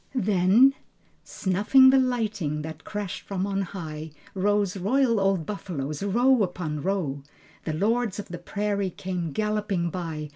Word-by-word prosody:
Then... 210 +4 +4 0.5
Snuffing 210 +8 +4
the 270 - +5
lightning 215 - -1
that 160 0 -8
crashed 205 -3 -5
from 195 -1 -3
on 195 -1 -1
high 160 -5 -6 0.2
Rose 205 0 +1
royal 230 +4 +2
old 195 -4 +1
buffaloes, 155 -8 -5
row 240 +5 +3
upon 175 -6 -2
row. 165 -7 -1 0.4
The 155 - -2
lords 215 +4 0
of 205 - -7
the 175 -1 -6
prairie 200 +2 -2
came 180 -2 -4
galloping 210 -2 -1
by. 160 -4 -5
195 Hz, 140 wpm, -26 LUFS, 170-210 Hz, 0.5 s, the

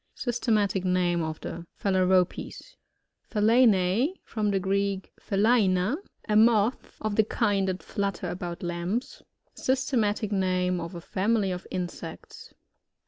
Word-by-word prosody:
Systematic 215 -6 0
name 180 -2 +1
of 160 -1 -4
the 170 0 -7
Fhalaropes. 185 -2 0 0.5
PHALENiE 220 - +3
>From 215 -2 -2
the 195 -1 +1
Greek 195 0 -1
phulaina^ 200 0 +2 0.3
a 210 - +1
moth, 220 +1 +3
(of 215 -1 -1
the 220 - +6
kind 205 -3 +1
that 185 0 -3
flutter 195 -3 -3
about 175 0 -5
lamps.) 175 +7 -3 0.3
Systematic 240 -5 0
name 185 -2 +1
of 170 +2 -6
a 170 - -6
family 200 +2 0
of 180 0 -5
insects. 175 -2 -7
195 Hz, 120 wpm, -27 LUFS, 180-215 Hz, 0.5 s, the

